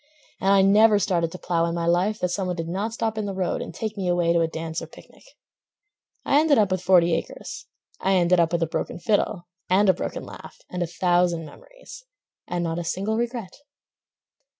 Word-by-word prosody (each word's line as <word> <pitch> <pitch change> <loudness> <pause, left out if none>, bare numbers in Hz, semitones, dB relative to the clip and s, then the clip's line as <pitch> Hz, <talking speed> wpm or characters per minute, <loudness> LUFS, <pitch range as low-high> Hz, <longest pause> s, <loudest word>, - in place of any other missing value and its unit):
And 195 - 0
I 195 -1 +5
never 210 +2 +5
started 170 -4 0
to 185 - -7
plow 170 -2 0
in 170 0 -2
my 170 -1 -2
life 180 +5 +2
That 180 - 0
some 185 +1 -2
one 180 - -2
did 165 -1 -4
not 195 +6 -2
stop 225 -1 -2
in 210 - -2
the 195 - -4
road 185 -2 -1
And - - -6
take 215 +5 -5
me 195 -3 -3
away 175 -1 +2
to 170 - +3
a 165 - +2
dance 160 0 -5
or - - -7
picnic. - - -17 1.0
I 285 - +4
ended 305 -2 +4
up 205 -3 +3
with 185 -1 0
forty 175 -2 +4
acres; 165 - -5 0.3
I 195 - +1
ended 180 -1 +3
up 165 -1 +2
with 170 -1 +1
a - - +2
broken 160 - -4
fiddle— 200 -1 0 0.2
And 195 +2 +4
a - - +6
broken 180 - -5
laugh, - - -11
and 180 - -4
a 175 - 0
thousand 175 -1 +1
memories, - - -14 0.4
And 175 -1 -2
not 165 0 -2
a - - -3
single 195 +6 -2
regret. 235 -4 -3
180 Hz, 220 wpm, -24 LUFS, 170-205 Hz, 1.0 s, a